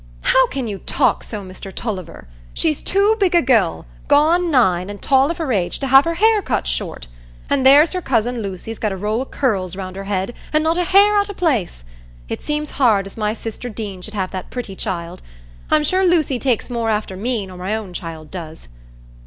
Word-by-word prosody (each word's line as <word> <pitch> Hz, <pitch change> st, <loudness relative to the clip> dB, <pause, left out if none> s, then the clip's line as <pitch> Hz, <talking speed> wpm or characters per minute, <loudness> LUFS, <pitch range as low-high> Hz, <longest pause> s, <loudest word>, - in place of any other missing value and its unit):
"How 260 Hz, -1 st, +4 dB
can 260 Hz, -2 st, -4 dB
you 200 Hz, -3 st, -5 dB
talk -, -, +1 dB
so, 210 Hz, -3 st, -6 dB
Mr 185 Hz, +1 st, -9 dB
Tulliver? 185 Hz, -, -6 dB, 0.3 s
She's 310 Hz, -3 st, 0 dB
too 400 Hz, +3 st, +2 dB
big 370 Hz, -3 st, +2 dB
a 340 Hz, -, +6 dB
gell—gone 260 Hz, -, +2 dB
nine, 190 Hz, -, +2 dB
and 205 Hz, 0 st, -7 dB
tall 270 Hz, +1 st, +3 dB
of 340 Hz, -, -3 dB
her 315 Hz, -7 st, -1 dB
age—to 195 Hz, +7 st, -1 dB
have 270 Hz, +1 st, +6 dB
her 335 Hz, 0 st, -1 dB
hair 435 Hz, +3 st, +4 dB
cut 200 Hz, -, -1 dB
short; -, -, -3 dB, 0.5 s
an' 280 Hz, -, +3 dB
there's 285 Hz, +6 st, +6 dB
her 365 Hz, -, -2 dB
cousin 245 Hz, -3 st, 0 dB
Lucy's 200 Hz, +2 st, -6 dB
got 215 Hz, -, -1 dB
a 190 Hz, -, -4 dB
row 210 Hz, +5 st, -1 dB
o' -, -, -3 dB
curls 195 Hz, -11 st, -1 dB
round 185 Hz, -1 st, -6 dB
her 195 Hz, 0 st, -6 dB
head, 195 Hz, +3 st, -2 dB, 0.2 s
an' 305 Hz, 0 st, +3 dB
not 325 Hz, +2 st, +1 dB
a 355 Hz, -, +1 dB
hair 405 Hz, +3 st, +5 dB
out 405 Hz, 0 st, 0 dB
o' 405 Hz, -, -6 dB
place. 245 Hz, -, -1 dB, 0.5 s
It -, -, -4 dB
seems 300 Hz, 0 st, -3 dB
hard 215 Hz, -6 st, +4 dB
as 195 Hz, -, -10 dB
my 215 Hz, 0 st, -1 dB
sister 230 Hz, +2 st, -6 dB
Deane 205 Hz, -4 st, -6 dB
should 215 Hz, +3 st, -9 dB
have 190 Hz, -2 st, -2 dB
that 185 Hz, -1 st, -6 dB
pretty 235 Hz, -6 st, -6 dB
child; 180 Hz, -3 st, -5 dB, 0.5 s
I'm 305 Hz, -1 st, +3 dB
sure 370 Hz, +5 st, +1 dB
Lucy 320 Hz, -8 st, +2 dB
takes 250 Hz, -2 st, -1 dB
more 230 Hz, -2 st, -1 dB
after 210 Hz, -3 st, -1 dB
me 220 Hz, +1 st, -2 dB
nor 185 Hz, -1 st, -11 dB
my 190 Hz, +4 st, -2 dB
own 210 Hz, -5 st, -6 dB
child 160 Hz, -3 st, -7 dB
does. 160 Hz, -, -9 dB
225 Hz, 210 wpm, -19 LUFS, 190-295 Hz, 0.5 s, a